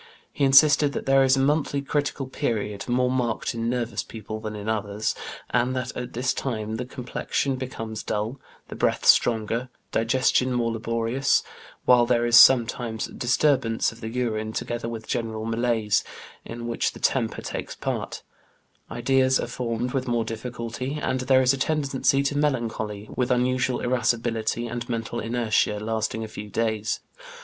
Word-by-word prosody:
He 140 - +1
insisted 140 +1 +6
that - - -4
there 135 0 +5
is 135 0 +4
a - - +2
monthly 145 +1 +1
critical 140 0 -2
period, 105 -4 -3
more 125 +1 +2
marked 120 -3 -1
in 115 0 -2
nervous 120 -1 -1
people 110 -1 -7
than 110 -1 -5
in 105 0 -7
others, 105 -1 -1 0.4
and 125 +1 +1
that 125 -1 -3
at 125 - -5
this 125 +2 0
time 110 -4 -3
the 125 - -4
complexion 130 +1 -2
becomes 115 -4 -5
dull, 110 +6 -3 0.3
the - - -7
breath - - 0
stronger, 115 +2 +3 0.2
digestion 125 +2 +2
more 120 -1 0
laborious, 115 +3 +1 0.4
while 120 -1 +5
there 120 -1 +2
is 120 0 +3
sometimes 120 -2 +5
disturbance 125 -2 +1
of 115 - -15
the 110 - -4
urine, 110 -3 -2
together 120 0 -3
with 115 -1 -6
general 110 -2 -3
malaise, 115 -2 +1 0.4
in 120 0 -7
which 120 0 -1
the - - -11
temper - - 0
takes - - -5
part; - - -4 0.7
ideas 130 +2 +2
are - - -1
formed 120 0 -3
with 130 -2 -1
more 120 -2 0
difficulty, 120 +4 -5
and 130 -3 -1
there 130 0 +4
is 130 +1 +4
a 135 - -4
tendency 140 -2 +1
to 140 +1 -1
melancholy, 115 -7 -1
with 125 -1 0
unusual 125 0 +1
irascibility 120 -2 0
and 120 +1 -5
mental 115 0 -3
inertia, 115 -2 0
lasting 110 +1 -2
a - - -5
few 105 -1 -8
days. 110 0 -1
120 Hz, 160 wpm, -25 LUFS, 115-130 Hz, 0.7 s, insisted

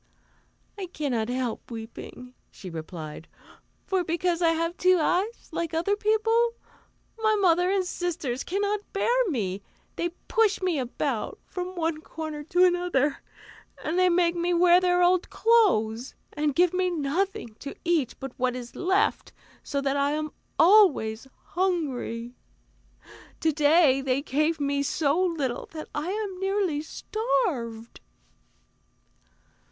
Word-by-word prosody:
"I 380 - -4
cannot 260 -9 -2
help 250 -2 -3
weeping," 235 +2 -9 0.2
she 185 - -10
replied; 160 -1 -7 0.6
"for 375 -2 0
because 345 +1 -1
I 335 - +4
have 330 +1 0
two 370 0 +4
eyes, 380 +8 -1
like 335 -1 -3
other 345 +5 +1
people, 450 +2 +2 0.6
my 435 -1 +3
mother 360 -3 +3
and 385 -1 +1
sisters 310 -8 -3
cannot 405 +3 -1
bear 395 - 0 0.2
me; 200 - -2 0.4
they 345 - 0 0.2
push 445 -4 +2
me 360 -6 0
about 255 -1 -2
from 365 0 -5
one 325 -2 -1
corner 315 -2 -6
to 355 +3 +4
another 350 -6 +1 0.6
and 320 - -2 0.2
make 345 -1 +3
we 350 0 0
wear 350 +1 +6
their 360 0 +3
old 360 0 +3
clothes, 270 - +2 0.2
and 295 -2 -1
give 355 0 +4
me 365 0 +1
nothing 345 - -2
to 280 - -7
eat 330 -7 +1
but 270 -1 -6
what 250 0 +1
is 245 -1 -8
left, 380 +2 +1 0.3
so 280 - -2
that 275 0 0
I 280 +1 +1
am 305 0 -3 0.3
always 310 - +4 0.2
hungry. 275 -10 -2 1.1
To 320 - +3
day 295 -2 +4
they 270 +1 0
gave 305 +3 0
me 280 0 0
so 290 +3 +1
little 300 -9 -2
that 310 -1 -7
I 300 +4 -3
am 400 -2 -3
nearly 385 -6 0
starved." 300 - -2
330 Hz, 135 wpm, -26 LUFS, 270-365 Hz, 1.1 s, wear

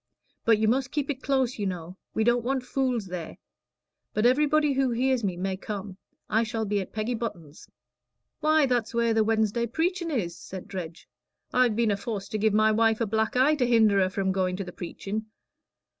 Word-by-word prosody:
But 225 -2 +5
you 215 0 +1
must 255 +3 +1
keep 290 0 -1
it 270 -1 -7
close, 260 -4 0
you 200 - 0
know. 180 -1 -5 0.2
We 220 - +2
don't 240 +1 +2
want 260 +1 -1
fools 250 -3 -1
there. 180 -3 -6 0.8
But 215 - +2
everybody 295 +3 +3
who 270 -1 +2
hears 250 +1 +1
me 185 -3 -1
may 190 +1 -2
come. 195 -1 -6 0.3
I 220 +1 +2
shall 225 -1 -2
be 205 -1 0
at 190 - -8
Peggy 220 +3 -2
Button's." 175 -10 -6 0.7
"Why, 310 -1 +4
that's 240 -3 -1
where 235 -1 +2
the 220 -1 +3
Wednesday 220 +1 +1
preachin' 340 - -1
is," 190 - -2
said 185 +2 -9
Dredge. 180 -5 -7 0.5
"I've 250 -3 +3
been 230 -1 +2
aforced 200 0 -4
to 215 - -1
give 220 +1 +3
my 215 0 +4
wife 225 0 +3
a 230 - +1
black 220 +2 0
eye 265 +4 +4
to 260 -5 +1
hinder 220 -4 +4
her 185 -1 +3
from 190 0 -1
going 185 -1 0
to 195 - -4
the 180 -1 -9
preachin'. 205 +5 -5
220 Hz, 200 wpm, -27 LUFS, 200-250 Hz, 0.8 s, But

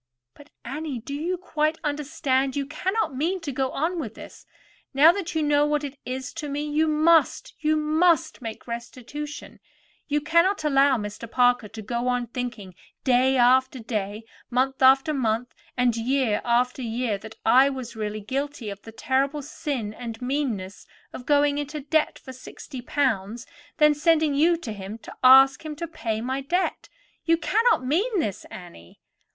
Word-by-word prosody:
"But, 290 0 -17 0.2
Annie, 285 +2 -4
do 240 +5 -7
you 335 +6 -2
quite 315 -3 -1
understand? 290 -3 -1
You 280 -1 -1
cannot 370 +3 -2
mean 340 +8 -1
to 305 -4 -4
go 265 0 -1
on 335 +6 -2
with 225 -8 -6
this. - - -12 0.5
Now 305 +4 +8
that 355 -2 -5
you 315 - +1
know 290 0 +3
what 295 0 0
it 280 -1 -7
is 260 +2 -5
to 295 - -5
me, 285 +1 -3
you 305 +2 +1
must—you 310 0 +2
must 310 0 +2
make 225 -2 -7
restitution. 255 +5 -7 0.5
You 295 0 +1
cannot 335 +5 +2
allow 275 -2 +4
Mr. 210 +2 -6
Parker 245 -2 +2
to 220 +2 -9
go 235 +3 -2
on 245 -1 0
thinking 235 -5 -6 0.3
day 260 +1 +3
after 260 +2 +4
day, 215 -2 -4 0.3
month 265 +2 0
after 270 +4 +5
month, 240 -2 -1 0.2
and 250 -2 +2
year 235 -2 0
after 250 +2 +1
year, 230 -3 -2
that 220 +2 -11
I 255 +5 +6
was 260 -4 -6
really 215 -1 -4
guilty 265 0 -4
of 200 0 -9
the 225 - -11
terrible 270 +5 -1
sin 275 -7 -4
and 230 -1 -7
meanness 250 -8 -3 0.3
of 245 - -9
going 290 0 +3
into 295 +1 -4
debt 300 +2 0
for 260 - -11
sixty 260 +1 -10
pounds, 235 -4 -1
and 335 0 -24
then 300 -1 +5
sending 315 0 +2
you 330 +4 +3
to 285 -9 -7
him 200 +1 -7
to - - -12
ask 265 +2 +7
him 310 -1 -6
to 335 +2 -5
pay 225 -9 -3
my 260 +3 -2
debt. 355 +7 -2 0.3
You 330 0 +3
cannot 440 - +2
mean 385 - +1
this, 205 - -3
Annie?" 170 - -12
270 Hz, 170 wpm, -25 LUFS, 240-300 Hz, 0.5 s, Now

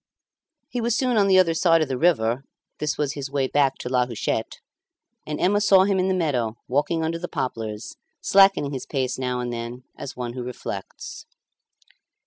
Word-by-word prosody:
He 245 - -3
was 235 0 +1
soon 255 -2 +1
on 205 -2 +4
the 190 -1 +5
other 175 -3 +5
side 165 -1 +4
of - - -3
the 130 - -2
river 125 -6 +2 0.4
(this 150 0 -1
was 145 -1 -1
his 140 -2 -5
way 140 -1 0
back 135 0 +2
to - - -6
La 125 -1 +2
Huchette), 115 -1 -2 0.7
and 150 0 -3
Emma 205 +3 +3
saw 195 -2 +6
him 195 -1 +1
in 185 - +2
the 190 - +1
meadow, 125 -10 0
walking 150 +5 0
under 165 +1 -1
the 175 - -4
poplars, 110 -6 -4 0.2
slackening 195 -7 +4
his 130 - -5
pace 130 -3 -2
now 125 -1 -1
and 120 -1 -3
then 120 +2 -6
as 135 - -8
one 120 -1 -4
who 125 - -5
reflects. 120 -5 -7
140 Hz, 190 wpm, -24 LUFS, 125-180 Hz, 0.7 s, saw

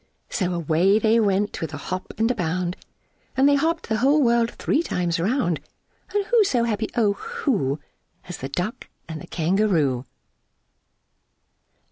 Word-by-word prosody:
So 185 -5 0
away 170 +5 +3
they 220 +1 +3
went 205 -1 +1
with 160 -1 -4
a - - -5
hop 185 +6 -5
and 225 +2 +2
a - - +1
bound, 180 -3 -2 0.6
And 270 +1 +5
they 285 - +5
hopped 320 +4 +1
the 220 - 0
whole 275 +6 +4
world 235 -1 +3
three 295 - 0
times 175 - -1
round; 180 - +1 0.6
And 410 -1 +2
who 465 0 +4
so 250 -11 +1
happy, 220 -2 -1
O 210 -4 +3
who, 240 - -1 0.5
As 180 - -6
the 135 - -6
Duck 180 +10 -4 0.2
and 160 -2 -6
the - - -10
Kangaroo? 165 - +1
205 Hz, 155 wpm, -24 LUFS, 170-240 Hz, 0.6 s, And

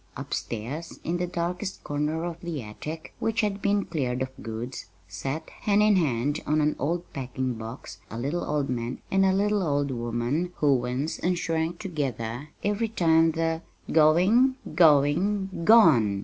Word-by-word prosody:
Upstairs, 125 +9 -5
in 170 +2 -1
the 180 0 -1
darkest 180 +3 -3
corner 150 +2 -1
of 170 -1 -5
the 165 -7 -4
attic 155 +10 -8
which 225 0 0
had 205 -2 -1
been 200 0 +1
cleared 130 -5 -1
of 130 - -4
goods 115 +4 -6 0.2
sat, 135 +11 -5
hand 210 0 +2
in 210 -1 +5
hand 145 -3 +1
on 150 +1 +2
an 150 0 +2
old 170 +6 -1
packing 130 -1 -3
box, 115 +3 -8
a 115 - -6
little 145 +9 -2
old 145 -2 -1
man 120 -1 -3
and 195 0 +4
a 190 - +4
little 205 +2 +2
old 145 -4 0
woman 120 +8 -2
who 145 -2 +3
winced 125 +4 -1
and 180 0 +2
shrank 165 0 -1
together 140 - -4
every 210 +2 0
time 165 -5 +3
the 165 0 -1 0.3
"Going, 185 - +5 0.2
going, 175 +6 +4 0.2
gone!" 135 - +6
155 Hz, 160 wpm, -26 LUFS, 130-180 Hz, 0.3 s, gone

